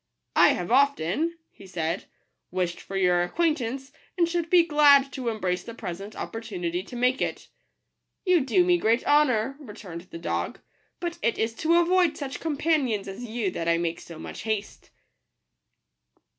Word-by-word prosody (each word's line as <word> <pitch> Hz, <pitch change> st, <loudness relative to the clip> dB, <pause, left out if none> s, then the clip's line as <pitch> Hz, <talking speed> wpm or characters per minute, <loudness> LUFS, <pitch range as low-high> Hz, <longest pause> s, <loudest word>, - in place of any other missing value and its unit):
" -, -, -52 dB
I -, -, +4 dB
have 175 Hz, -, -4 dB
often/' 280 Hz, -, +2 dB, 0.2 s
he 195 Hz, -, -15 dB
said, 170 Hz, 0 st, -3 dB, 0.2 s
" -, -, -51 dB
wished 180 Hz, -1 st, -2 dB
for 195 Hz, -, -5 dB
your 180 Hz, -2 st, +3 dB
acquaintance, 270 Hz, -, -1 dB, 0.3 s
and 340 Hz, -2 st, +3 dB
should 340 Hz, -1 st, -2 dB
be 355 Hz, -1 st, +6 dB
glad 285 Hz, -3 st, +5 dB
to 255 Hz, -3 st, -2 dB
embrace 190 Hz, -5 st, -1 dB
the 230 Hz, -, -9 dB
present 195 Hz, +1 st, -7 dB
opportunity 180 Hz, -6 st, -4 dB
to 230 Hz, +6 st, -11 dB
make 250 Hz, +2 st, +1 dB
it -, -, -3 dB, 0.2 s
." -, -, -51 dB
— -, -, -54 dB
" -, -, -55 dB
You 365 Hz, -2 st, +5 dB
do 270 Hz, +7 st, +3 dB
me 355 Hz, -1 st, +3 dB
great 230 Hz, -1 st, +2 dB
honour," 275 Hz, -3 st, +3 dB
returned 205 Hz, -, -9 dB
the -, -, -8 dB
dog; 165 Hz, -, -3 dB, 0.2 s
" -, -, -43 dB
but 345 Hz, -1 st, -4 dB
it 230 Hz, -, +1 dB
is 225 Hz, +1 st, 0 dB
to 330 Hz, +1 st, +2 dB
avoid 345 Hz, -2 st, +3 dB
such 270 Hz, -3 st, -5 dB
companions 290 Hz, -9 st, 0 dB
as 195 Hz, +5 st, -7 dB
you 220 Hz, -4 st, -2 dB
that 165 Hz, -1 st, -4 dB
I 170 Hz, -, +3 dB
make 170 Hz, -1 st, -2 dB
so 170 Hz, -, -11 dB
much -, -, -8 dB
haste." 215 Hz, -2 st, -4 dB
235 Hz, 185 wpm, -26 LUFS, 190-300 Hz, 0.3 s, be